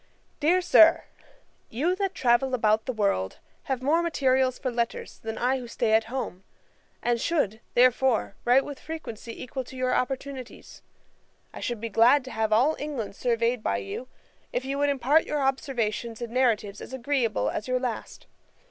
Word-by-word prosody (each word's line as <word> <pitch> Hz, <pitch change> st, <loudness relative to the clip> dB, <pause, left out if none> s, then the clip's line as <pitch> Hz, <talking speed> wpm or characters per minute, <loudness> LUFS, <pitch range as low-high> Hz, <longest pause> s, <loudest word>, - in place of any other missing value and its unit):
'DEAR 345 Hz, +5 st, +3 dB
SIR, 335 Hz, -2 st, +6 dB, 0.7 s
'You 305 Hz, +11 st, 0 dB
that 390 Hz, -2 st, -2 dB
travel 255 Hz, +1 st, +2 dB
about 220 Hz, -2 st, +2 dB
the -, -, +1 dB
world, 200 Hz, -, -1 dB, 0.3 s
have 260 Hz, -2 st, -2 dB
more 315 Hz, +5 st, +3 dB
materials 265 Hz, -6 st, +1 dB
for 255 Hz, -, -3 dB
letters, 235 Hz, -1 st, -3 dB
than 220 Hz, 0 st, -5 dB
I 260 Hz, +2 st, +1 dB
who 245 Hz, -, -8 dB
stay 230 Hz, -1 st, 0 dB
at 220 Hz, 0 st, +4 dB
home; 225 Hz, -6 st, -5 dB, 0.6 s
and 240 Hz, -1 st, +1 dB
should, 225 Hz, -, 0 dB
therefore, 250 Hz, -3 st, +3 dB
write 250 Hz, +3 st, +4 dB
with 285 Hz, -2 st, -7 dB
frequency 235 Hz, -8 st, -7 dB
equal 260 Hz, +1 st, -5 dB
to 260 Hz, -, -11 dB
your 255 Hz, 0 st, 0 dB
opportunities. 260 Hz, 0 st, -4 dB, 0.7 s
I -, -, -8 dB
should 240 Hz, -2 st, -3 dB
be 230 Hz, +1 st, -4 dB
glad 245 Hz, +6 st, +5 dB
to 260 Hz, -, -8 dB
have 220 Hz, -1 st, -1 dB
all 255 Hz, +9 st, +4 dB
England 275 Hz, -9 st, -4 dB
surveyed 235 Hz, 0 st, 0 dB
by 100 Hz, -, 0 dB
you, 100 Hz, -, -6 dB, 0.4 s
if 255 Hz, -, -2 dB
you 275 Hz, +1 st, -2 dB
would 290 Hz, 0 st, +2 dB
impart 280 Hz, +3 st, +3 dB
your 295 Hz, -2 st, -1 dB
observations 235 Hz, -4 st, -1 dB
in 235 Hz, -1 st, -6 dB
narratives 220 Hz, -5 st, +1 dB
as -, -, -9 dB
agreeable 240 Hz, -, 0 dB
as 210 Hz, -, -4 dB
your 255 Hz, 0 st, +1 dB
last. 245 Hz, -3 st, -5 dB
250 Hz, 170 wpm, -26 LUFS, 225-270 Hz, 0.7 s, SIR